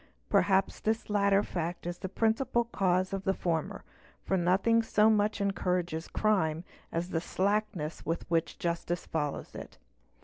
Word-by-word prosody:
Perhaps 195 -1 +3
this 220 0 -1
latter 200 -1 +3
fact 175 0 -4
is 175 0 -4
the 190 - -4
principal 230 +4 +1
cause 185 -4 0
of 195 -1 -2
the 195 0 +1
former; 165 -3 -2 0.4
for 195 - 0
nothing 190 +6 +3
so 220 -1 +4
much 210 0 +1
encourages 180 -4 -1
crime 175 -7 +1 0.3
as 170 +2 -2
the 165 - 0
slackness 195 -4 -1
with 165 +2 -2
which 165 -1 0
justice 170 0 -2
follows 150 -3 -3
it. - - -9
190 Hz, 145 wpm, -30 LUFS, 170-210 Hz, 0.4 s, so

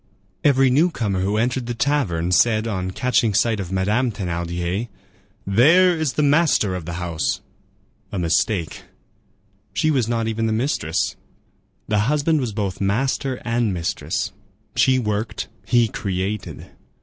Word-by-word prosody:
Every 135 -2 +4
newcomer 125 - +1
who 100 +3 0
entered 120 +2 0
the 120 - -3
tavern 115 - 0
said, 110 +3 +3
on 95 -5 -2
catching 115 0 +1
sight 115 0 +2
of 95 -2 -5
Madame 105 +7 +1
Thénardier, 90 +2 -3 0.6
"There 165 - +5
is 160 -5 -1
the 150 - +1
master 145 - +3
of 90 -3 -5
the 85 - -5
house." 90 +6 -2 0.7
A 100 - -4
mistake. 85 +1 0 0.9
She 155 - +2
was 130 -6 +1
not 115 -1 -1
even 115 0 -1
the 110 - 0
mistress. 110 - -1 0.7
The 105 -1 +1
husband 150 +1 +2
was 120 -4 -2
both 100 -3 -3
master 130 +5 0
and 115 -4 0
mistress. 85 -1 -2 0.4
She 130 0 +4
worked; 105 -2 -2 0.2
he 120 -1 +4
created. 95 -1 -4
110 Hz, 135 wpm, -22 LUFS, 95-130 Hz, 0.9 s, There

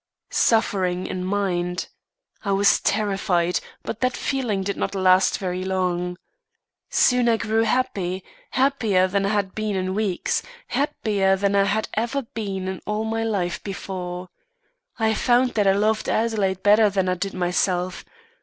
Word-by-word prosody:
"Suffering 185 -5 +2
in 185 - -4
my 200 +1 0
mind. 180 +1 -2 0.6
I 200 -3 0
was 200 +1 +4
terrified, 195 -4 +1 0.2
but 225 - -5
that 255 -1 0
feeling 240 -8 -1
did 200 +1 -2
not - - -3
last 185 0 +4
very 185 -2 -3
long. 180 -1 -1 0.7
Soon 250 -1 +3
I 225 - +3
grew 225 0 +1
happy, 190 -6 -1 0.3
happier 225 -9 +2
than 195 +1 0
I - - 0
had 200 -2 0
been 215 -2 -2
in 185 0 -1
weeks, 200 -3 0 0.3
happier 210 -9 +1
than 200 +1 0
I 200 0 +4
had 215 +2 0
ever 240 +5 -1
been 200 -5 -4
in 190 -1 -4
all 210 +1 -1
my 225 0 -1
life 180 -6 -1
before. 185 -2 -5 0.7
I 220 -1 +2
found 245 +2 +3
that 205 -2 +2
I 195 - +6
loved 215 +2 +1
Adelaide 205 -4 0
better 210 +1 +6
than 190 -2 0
I 185 - +2
did 195 +2 -4
myself. 180 0 0
200 Hz, 155 wpm, -23 LUFS, 185-220 Hz, 0.7 s, I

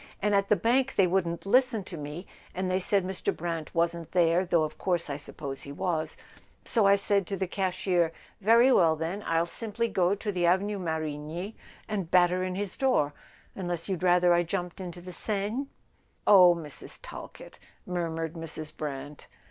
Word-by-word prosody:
And 205 +1 +1
at 200 0 +3
the 210 - +6
bank 250 +7 +1
they 195 - +5
wouldn't 175 -2 0
listen 250 0 +3
to 180 - -9
me, 150 +4 -6 0.3
and 185 0 -1
they 185 - +2
said 195 0 +1
Mr. 190 0 -1
Brant 165 -1 -4
wasn't 170 -1 -1
there, 175 0 +4
though 170 -3 +2
of 155 0 -5
course 175 -5 -1
I 140 - -3
suppose 140 -2 -7
he 140 - -8
was; 165 0 -2 0.5
so 220 -4 +3
I 200 - +7
said 200 -2 +1
to 195 - -3
the 190 - 0
cashier: 180 -2 0 0.3
'Very 230 +5 +6
well, 165 -9 +5
then, 165 +6 -4
I'll 165 0 +2
simply 230 +5 -2
go 190 -2 +2
to 205 +1 -3
the 175 -3 +1
Avenue 200 +3 +1
Marigny 160 +3 -4 0.3
and 195 -6 -3
batter 180 0 +4
in 185 0 -3
his 200 -1 -3
door—unless 175 - -2
you'd 190 -3 -2
rather 180 -1 +4
I 175 - +4
jumped 175 +1 -4
into 175 -1 -7
the 180 +1 -8
Seine 215 +8 -2 0.2
?' - - -40
" - - -42
"Oh, 180 -4 +8
Mrs. 155 -4 -8
Talkett - - -10 0.2
" - - -38
murmured 165 -3 -3
Mrs. 160 -2 -6
Brant. 145 -1 -6
180 Hz, 185 wpm, -28 LUFS, 165-195 Hz, 0.5 s, Oh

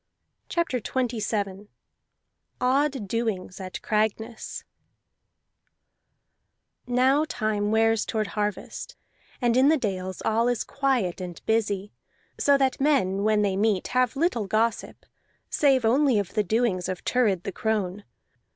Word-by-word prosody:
CHAPTER 335 -7 0
XXVII 210 -5 -2 0.9
ODD 265 -2 +1
DOINGS 210 -4 -2
AT 185 -1 -6
CRAGNESS 220 +2 -2 2.2
Now 260 +4 +3
time 215 -2 -1
wears 225 0 +3
toward 215 -1 -1
harvest, 210 -1 -4 0.5
and 240 -1 +3
in 260 +2 +5
the 315 - +4
dales 190 -6 -4
all 230 +2 +2
is 245 -2 0
quiet 255 -11 -1
and 175 -2 -6
busy, 205 -3 0 0.5
so 280 -1 +4
that 270 -1 0
men 225 -10 +2
when 215 0 +3
they 195 -2 +1
meet 205 -1 +1
have 255 -1 +1
little 270 - 0
gossip, 220 +2 -1 0.5
save 270 -5 +3
only 260 +1 +3
of 200 -3 -2
the 210 - +2
doings 200 -3 0
of 185 -1 -4
Thurid 210 -8 +1
the 195 - -4
crone. 205 -1 -2
220 Hz, 125 wpm, -26 LUFS, 200-250 Hz, 2.2 s, in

